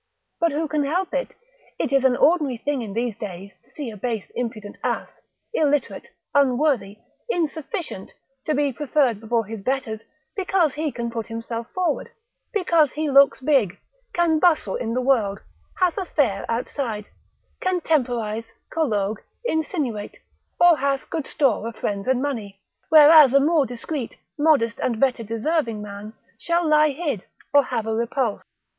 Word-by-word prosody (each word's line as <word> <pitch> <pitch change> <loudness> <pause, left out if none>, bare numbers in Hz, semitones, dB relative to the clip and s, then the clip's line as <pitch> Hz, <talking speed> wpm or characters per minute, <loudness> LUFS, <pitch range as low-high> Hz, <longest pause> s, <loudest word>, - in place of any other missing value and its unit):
But 335 -1 +2
who 310 +3 -1
can 300 -1 0
help 350 +6 -1
it? - - 0 0.5
It 275 - -2
is 275 -1 +4
an 250 -2 +4
ordinary 300 -6 +3
thing 280 +2 -2
in 210 -4 -6
these 230 0 -1
days 195 -1 -7
to - - -31
see 280 -6 -6
a - - -9
base 220 0 -4
impudent 225 -4 -5
ass, - - -3 0.3
illiterate, 295 - 0 0.3
unworthy, 260 -7 +2 0.3
insufficient, 320 - -3 0.3
to 305 - 0
be 285 -1 +1
preferred 265 -4 +1
before 225 0 0
his 220 0 -7
betters, 230 -2 -2 0.3
because 370 -6 +1
he 305 0 -2
can 235 -2 -4
put 230 -1 -4
himself 230 0 -5
forward, 360 -5 -1 0.4
because 335 - +2
he 305 -1 -1
looks 275 0 +5
big, 255 - +2 0.3
can 335 -2 +2
bustle 310 - +3
in 230 0 -3
the 255 - +1
world, 230 -7 +2 0.4
hath 365 0 +2
a 380 - -3
fair 240 - 0
outside, 230 -2 -3 0.6
can 370 -1 +1
temporise, 240 -8 0 0.3
collogue, 215 -9 0 0.3
insinuate, 300 - -2 0.4
or 350 -2 +7
hath 275 0 -1
good 315 -4 -3
store 255 -7 +1
of 230 - -6
friends 200 -1 -3
and 260 0 +2
money, 215 -9 -4 0.3
whereas 305 -3 +8
a - - +8
more 295 -1 +3
discreet, 245 +2 -5 0.2
modest, 290 -7 +2
and 235 -3 -1
better 255 -2 +2
deserving 230 +2 -1
man 210 +1 -8 0.3
shall 340 0 0
lie 305 0 +5
hid 285 - -3 0.3
or 285 -2 +6
have 225 -3 -2
a 225 - -1
repulse. 235 0 -1
265 Hz, 155 wpm, -23 LUFS, 225-310 Hz, 0.6 s, whereas